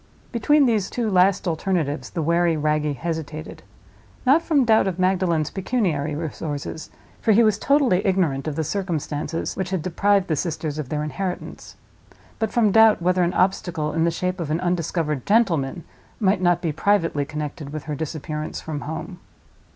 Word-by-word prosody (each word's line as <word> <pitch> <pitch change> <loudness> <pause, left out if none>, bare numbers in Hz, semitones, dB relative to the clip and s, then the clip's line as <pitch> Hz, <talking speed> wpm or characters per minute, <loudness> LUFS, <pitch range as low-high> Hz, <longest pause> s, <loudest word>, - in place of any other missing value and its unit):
Between 280 +5 +3
these 215 -6 +1
two 230 -3 -2
last 190 +1 +3
alternatives 160 -3 -1
the 165 - -3
wary 170 0 +2
Wragge 150 -1 0
hesitated; 160 -1 -5 0.6
not 280 +6 +5
from 295 -6 +2
doubt 220 -3 +4
of 185 -3 -2
Magdalen's 185 -4 +1
pecuniary 175 - -1
resources—for 155 +5 -4
he 230 +3 +5
was 215 -2 +2
totally 265 -10 +3
ignorant 170 -9 +1
of 155 - -2
the 160 - -1
circumstances 165 -3 -3
which 190 -2 -3
had 185 -4 -2
deprived 195 +2 +2
the 155 - 0
sisters 155 -1 -3
of 140 -4 -5
their 150 0 -2
inheritance—but 190 +5 -7
from 220 -4 +3
doubt 220 +1 +6
whether 180 +1 +2
an 175 0 +1
obstacle 175 -5 0
in 165 0 +1
the 170 - +3
shape 180 +2 -2
of 165 -4 -3
an 155 +2 0
undiscovered 165 -5 -1
gentleman 175 -8 +2 0.4
might 190 -3 +2
not 175 -1 +2
be 165 - 0
privately 165 -3 +1
connected 150 0 -6
with 155 -1 -5
her 150 - -4
disappearance 155 0 -4
from 150 -2 -5
home. 160 +4 -6
170 Hz, 160 wpm, -23 LUFS, 155-195 Hz, 0.6 s, doubt